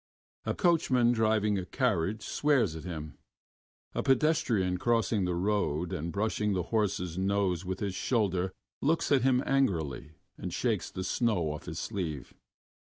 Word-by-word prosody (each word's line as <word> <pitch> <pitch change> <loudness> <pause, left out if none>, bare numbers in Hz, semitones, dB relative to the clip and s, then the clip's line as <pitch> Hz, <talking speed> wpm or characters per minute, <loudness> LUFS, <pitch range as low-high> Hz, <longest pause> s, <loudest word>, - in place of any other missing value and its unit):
A - - 0
coachman 130 - +3
driving 110 -3 +2
a 90 - -5
carriage 105 -4 0
swears 130 - +1
at 80 - -8
him; 80 -5 -6 0.7
a - - -1
pedestrian 125 - +2
crossing 115 -3 +1
the 90 -1 -1
road 90 -3 0
and 80 +3 -3
brushing 105 +1 0
the 90 -2 0
horse's 90 -5 0
nose 95 -2 0
with 95 +1 -4
his 100 -2 -1
shoulder 95 -4 0 0.3
looks 160 +3 +1
at 140 -3 +5
him 130 +1 +3
angrily 80 - 0 0.3
and - - -4
shakes - - -1
the 95 - -5
snow 95 -6 +1
off 75 - -7
his 80 - -5
sleeve. 85 - -4
100 Hz, 150 wpm, -30 LUFS, 90-120 Hz, 0.7 s, at